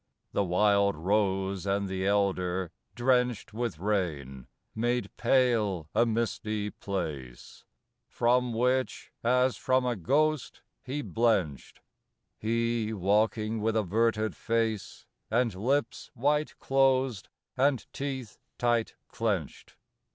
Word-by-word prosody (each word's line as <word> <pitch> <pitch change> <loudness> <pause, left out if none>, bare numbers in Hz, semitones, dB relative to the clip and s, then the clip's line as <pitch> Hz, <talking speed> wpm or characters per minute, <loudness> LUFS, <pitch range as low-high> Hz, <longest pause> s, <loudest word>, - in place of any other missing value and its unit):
The 100 - +1
wild 100 +1 +3
rose 95 +1 0
and 100 0 0
the 95 0 -2
elder, 95 -3 0 0.2
drenched 125 -3 +1
With 115 -7 -2
rain, 75 - -2 0.3
made 120 +2 -1
pale 110 - +2
a 120 - +3
misty 110 -2 -1
place, 75 -11 -6 0.4
From 125 +1 +2
which, 125 +3 0
as 125 0 +3
from 130 0 +1
a 125 -1 0
ghost, 140 - 0 0.2
he 140 +3 -4
blenched; 110 - 0 0.6
He 115 0 0
walking 110 +2 +1
with 110 +1 0
averted 110 +2 +1
face, 115 -2 -2 0.2
And 115 0 +1
lips 130 +10 -1
white 150 +5 0
closed 135 -5 +1 0.3
and 130 -4 +2
teeth 135 -6 -5 0.2
tight 120 -2 +1
clenched. 100 -10 -3
110 Hz, 105 wpm, -29 LUFS, 100-125 Hz, 0.6 s, wild